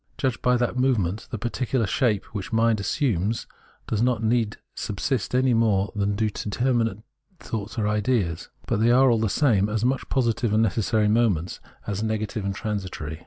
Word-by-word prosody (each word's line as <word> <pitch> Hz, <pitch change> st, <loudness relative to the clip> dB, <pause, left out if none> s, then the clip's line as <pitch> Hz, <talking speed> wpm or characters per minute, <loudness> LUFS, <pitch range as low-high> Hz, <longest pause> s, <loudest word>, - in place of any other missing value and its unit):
Judged 130 Hz, -4 st, -1 dB
by 125 Hz, 0 st, +3 dB
that 120 Hz, +1 st, -1 dB
movement, 110 Hz, -6 st, 0 dB
the 115 Hz, -, -4 dB
particular 120 Hz, +2 st, -1 dB
shapes 110 Hz, -2 st, +1 dB
which 100 Hz, -1 st, -5 dB
mind 115 Hz, -1 st, +2 dB
assumes 110 Hz, -, 0 dB, 0.4 s
do -, -, -2 dB
not 120 Hz, +1 st, +2 dB
indeed 110 Hz, -1 st, +1 dB, 0.2 s
subsist 115 Hz, +3 st, -2 dB
any 130 Hz, -1 st, +3 dB
more 110 Hz, -3 st, +2 dB
than 100 Hz, 0 st, 0 dB
do 110 Hz, +1 st, +1 dB
determinate 115 Hz, 0 st, -1 dB, 0.4 s
thoughts 110 Hz, +1 st, -5 dB
or 105 Hz, -2 st, +1 dB
ideas; 105 Hz, -6 st, 0 dB, 0.2 s
but -, -, 0 dB
they 115 Hz, +2 st, +3 dB
are, 130 Hz, +1 st, +5 dB
all 115 Hz, -, +2 dB
the 110 Hz, -1 st, +1 dB
same, 105 Hz, -5 st, +2 dB
as 110 Hz, +2 st, -1 dB
much 130 Hz, +1 st, -1 dB
positive 120 Hz, -3 st, +1 dB
and 110 Hz, +1 st, +4 dB
necessary 110 Hz, +1 st, +1 dB
moments, 105 Hz, -7 st, +1 dB, 0.3 s
as 100 Hz, 0 st, -3 dB
negative 110 Hz, 0 st, -2 dB
and 100 Hz, 0 st, -2 dB
tran 105 Hz, +1 st, -2 dB
sitory. 80 Hz, -4 st, -6 dB
110 Hz, 175 wpm, -25 LUFS, 105-120 Hz, 0.4 s, are